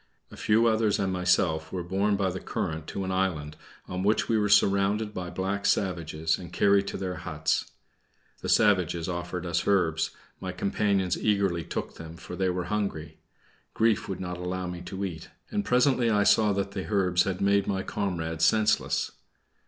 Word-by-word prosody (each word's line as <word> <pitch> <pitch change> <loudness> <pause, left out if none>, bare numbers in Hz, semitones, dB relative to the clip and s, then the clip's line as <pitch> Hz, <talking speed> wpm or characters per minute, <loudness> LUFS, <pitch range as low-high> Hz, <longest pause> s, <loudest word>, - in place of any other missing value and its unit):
A - - -10
few 110 +2 +3
others 110 -2 +2
and 95 -2 -1
myself 90 -3 +1
were 90 -2 -3
borne 100 +4 +1
by 95 -2 0
the 95 - -5
current 80 -3 -4
to 100 - -4
an 95 - -3
island, 85 -6 -1 0.3
on 90 0 -4
which 105 +3 +2
we 115 - +1
were 105 -1 +2
surrounded 100 +2 +3
by 90 -1 -5
black 95 +2 -2
savages, 80 -4 0
and 90 -2 -9
carried 100 -1 +3
to - - -4
their 90 -1 -4
huts. 80 -2 -2 0.7
The - - -4
savages 90 -6 +3
offered 90 0 -4
us 85 0 -1
herbs; 85 -5 +2 0.3
my 95 -1 -5
companions 100 -1 0
eagerly 100 -5 +1
took - - -5
them, 80 0 -9
for 90 - -8
they 95 0 0
were 90 0 -1
hungry. 100 -5 -3 0.6
Grief 110 -2 +2
would 95 - -4
not 90 -1 -5
allow 90 +1 -3
me 90 -1 -5
to 95 +2 -4
eat; 85 -3 -7 0.2
and 210 -1 0
presently 125 - +3
I 105 -2 +3
saw 105 +1 +4
that 100 0 -1
the 95 +1 -5
herbs 90 -3 +2
had 95 -2 -2
made 100 0 +2
my 95 -1 -1
comrades 80 -5 -2
senseless. 110 -1 +2
95 Hz, 180 wpm, -27 LUFS, 90-100 Hz, 0.7 s, saw